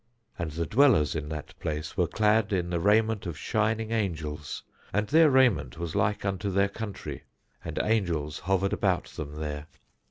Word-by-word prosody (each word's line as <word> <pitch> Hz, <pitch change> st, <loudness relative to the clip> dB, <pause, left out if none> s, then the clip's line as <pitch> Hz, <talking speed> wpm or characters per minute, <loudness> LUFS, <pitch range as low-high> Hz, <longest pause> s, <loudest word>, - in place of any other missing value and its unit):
And 85 Hz, -, -2 dB
the 85 Hz, +2 st, -3 dB
dwellers 110 Hz, -, +4 dB
in 75 Hz, -1 st, -3 dB
that 75 Hz, -2 st, -6 dB
place 75 Hz, 0 st, -4 dB
were 90 Hz, -3 st, +2 dB
clad 105 Hz, +2 st, +2 dB
in 90 Hz, -3 st, 0 dB
the 85 Hz, -, 0 dB
raiment 105 Hz, +1 st, +2 dB
of 85 Hz, -4 st, -5 dB
shining 110 Hz, +4 st, 0 dB
angels 80 Hz, -, -3 dB, 0.3 s
and 105 Hz, +2 st, +1 dB
their 160 Hz, +2 st, +6 dB
raiment 125 Hz, -, +3 dB
was 85 Hz, -1 st, -4 dB
like 105 Hz, +1 st, +1 dB
unto 100 Hz, 0 st, -1 dB
their 100 Hz, +1 st, +2 dB
country; 105 Hz, -1 st, -6 dB, 0.4 s
and -, -, -6 dB
angels 85 Hz, -9 st, 0 dB
hovered 95 Hz, +1 st, 0 dB
about -, -, 0 dB
them 75 Hz, 0 st, -7 dB
there. 75 Hz, -1 st, -5 dB
95 Hz, 165 wpm, -28 LUFS, 80-110 Hz, 0.4 s, their